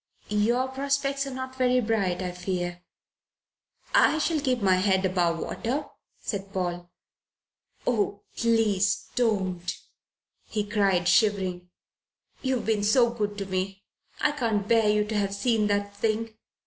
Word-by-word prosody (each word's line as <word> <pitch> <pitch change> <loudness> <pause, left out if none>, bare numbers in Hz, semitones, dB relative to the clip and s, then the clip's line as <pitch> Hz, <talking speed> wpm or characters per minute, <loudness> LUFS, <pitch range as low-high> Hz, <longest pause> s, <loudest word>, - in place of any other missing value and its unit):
"Your 235 +5 +2
prospects 275 +1 -1
are 270 - -5
not 260 0 -6
very 255 -1 +3
bright, 200 -6 0
I 180 - -2
fear." 175 -1 -3 1.1
"I 315 - +5
shall 315 0 +1
keep 260 -4 0
my 190 -3 +3
head 190 0 +2
above 175 -2 +1
water," 255 - -3 0.3
said 195 -2 -5
Paul. 175 -2 -3 1.0
"Oh, 205 -4 0
please 220 -4 +1
don't!" 190 -7 0 0.8
he 210 -2 -2
cried, 195 -4 +2
shivering. 185 -3 +2 0.7
"You 260 0 0
have 245 - -3
been 215 -2 +1
so 235 +3 +4
good 210 -3 -3
to 200 - -3
me. 190 +1 -3 0.4
I 300 - +2
can't 225 -8 -1
bear 225 -2 +4
you 210 0 +2
to 215 +1 -4
have 200 -1 0
seen 220 0 +1
that 205 0 -1
thing. 220 +1 -1
210 Hz, 140 wpm, -27 LUFS, 190-235 Hz, 1.1 s, I